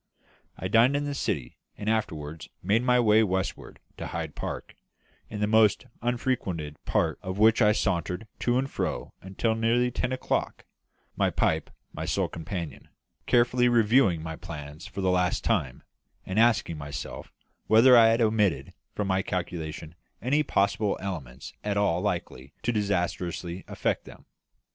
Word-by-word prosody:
I 95 - -3
dined 115 +7 +4
in 145 0 0
the 145 - -2
City, 70 - -3 0.2
and 105 - -6
afterwards 80 -9 -2
made 105 +5 +3
my 125 0 +3
way 110 -2 +5
westward 95 -2 -2 0.2
to - - -5
Hyde - - -4
Park, - - -6 0.6
in 105 -1 -5
the - - +3
most 110 0 +4 0.2
unfrequented 115 - -2
part - - 0
of 95 +1 -5
which 110 +3 +5
I 105 -1 +6
sauntered 90 -1 -1
to 120 0 +1
and 135 +1 0
fro - - -3
until 95 +4 -1
nearly 115 +2 +2
ten 125 +1 -2
o'clock 130 - -2 0.5
my - - +2
pipe 80 -1 0 0.2
my - - -4
sole - - 0
companion 85 0 -6 0.4
carefully 125 0 +4
reviewing 115 -7 +3
my 80 -1 -5
plans 75 0 -8
for 100 - -6
the 95 -1 +2
last 90 0 +1
time, 80 - -1 0.4
and 95 +3 -1
asking 110 -9 +3
myself 70 0 -7 0.4
whether 115 +4 +7
I 115 -1 +8
had 115 +1 +3
omitted 105 -4 +1 0.2
from 105 - -1
my 95 0 +2
calculation 80 -4 -4 0.3
any 135 +7 +2
probable 100 -5 +1
element 70 -10 -6
at 105 -1 -1
all 90 -4 +2
likely 85 -9 -3
to 120 - +1
disastrously 90 -3 -2
affect - - -2
them. - - -14
100 Hz, 155 wpm, -27 LUFS, 85-115 Hz, 0.6 s, I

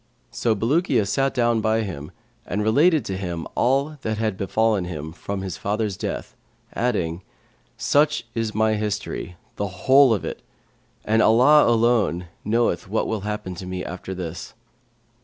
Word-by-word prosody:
So 115 -1 0
Bulukiya 120 - +1
sat 135 +7 +1
down 120 -3 +1
by 110 +1 +1
him 80 -9 -6 0.4
and 105 +3 -1
related 145 +5 +3
to 95 - -3
him 85 -3 -4
all 140 +4 +1
that 110 0 -2
had 110 -2 -1
befallen 105 0 +1
him 80 -3 -6
from 100 +2 -5
his 95 -3 -5
father's 105 -1 -1
death,[FN#535] - - -8
adding, 90 -8 -1 0.6
'Such 150 -2 +2
is 115 -2 -2
my 110 0 +3
history, 105 -4 -3 0.2
the 100 - -1
whole 130 +9 +4
of 105 - 0
it, - - -5 0.6
and 110 +1 +3
Allah 130 +7 +6
alone 110 -7 +2
knoweth 110 -5 0
what 110 - 0
will 110 -2 -2
happen 105 -2 -4
to 90 +1 -8
me 90 0 -4
after 95 +1 -6
this.' 85 -1 -6
110 Hz, 155 wpm, -23 LUFS, 95-120 Hz, 0.6 s, Allah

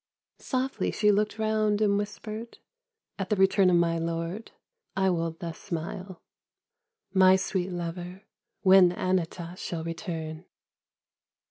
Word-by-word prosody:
Softly 260 0 -1
she 210 -1 +3
looked 210 +2 +1
round 215 -1 +1
and 205 -2 +3
whispered: 215 +2 -5 0.3
" 450 - -44
At 195 - -3
the 210 - +2
return 190 0 +4
of 180 - +4
my 170 -1 +2
lord 165 +6 -3 0.5
I 190 -1 +3
will 165 -1 -2
thus 165 -2 -6
smile. 175 +2 -6 0.9
My 190 -1 +7
sweet 190 -1 -1
lover, 175 +2 -5 0.4
when 185 -2 +7
Anata. 180 -1 -2
shall 165 -2 -4
return 165 -1 -5
185 Hz, 125 wpm, -28 LUFS, 170-210 Hz, 0.9 s, My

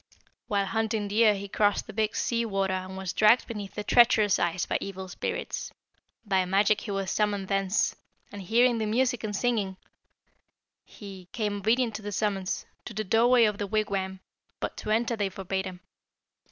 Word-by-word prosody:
"While 200 -1 +1
hunting 220 0 -1
deer 215 0 +4
he 200 0 -6
crossed 205 +1 +1
the 215 - -10
Big 215 +1 0
Sea 235 -1 0
Water 195 -3 -1
and 185 0 -4
was 190 -2 -4
dragged 215 +3 +5
beneath 210 -4 -7
the 210 - -3
treacherous 215 -3 +4
ice 175 +1 0
by - - -1
evil 190 -1 -6
spirits. 180 - -4 0.5
By 190 -2 +2
magic 200 +3 +2
he - - -8
was 195 -1 -2
summoned 205 -2 0
thence, 195 0 +1 0.4
and, 205 - -7
hearing 235 +4 +3
the 215 - -1
music 245 +2 +1
and 210 -1 -3
singing, 205 -5 0 1.1
he, 195 -3 -11
"'Came 210 -2 -1
obedient 225 +3 +1
to - - -11
the 205 0 -5
summons, 195 -1 -1 0.2
To 215 - -8
the 215 - -1
doorway 235 +4 +4
of 210 -2 +1
the 205 - -2
wigwam, 195 -3 -2 0.4
But - - -4
to - - -6
enter 230 +2 +1
they 205 -3 -1
forbade 190 0 -3
him. 185 -1 -8
205 Hz, 180 wpm, -27 LUFS, 195-220 Hz, 1.1 s, dragged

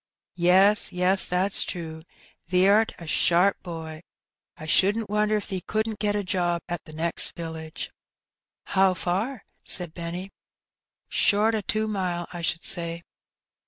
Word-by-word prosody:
"Yes, 190 +4 +5
yes, 180 +2 +4
that's 185 +2 +2
true; 160 -2 -6 0.5
thee'rt 200 +5 +4
a 170 - -10
sharp 175 +6 +2
boy. 160 -3 -7 0.6
I 155 - -9
shouldn't 200 +6 +2
wonder 210 0 +1
if 210 - -4
thee 190 -2 -3
couldn't 215 +1 -3
get 205 0 0
a 205 - -1
job 175 -3 -1
at 175 -1 -5
t' - - -11
next 165 +2 0
village." 160 -1 -7 0.7
"How 190 -1 +2
far?" 195 +8 -3 0.2
said 175 -3 +3
Benny. 175 +3 -6 0.8
"Short 210 +2 +2
o' 220 - -1
two 215 +2 -1
mile, 180 -4 -3
I 175 - -6
should 170 0 0
say." 170 0 -2
180 Hz, 140 wpm, -25 LUFS, 170-205 Hz, 0.8 s, Yes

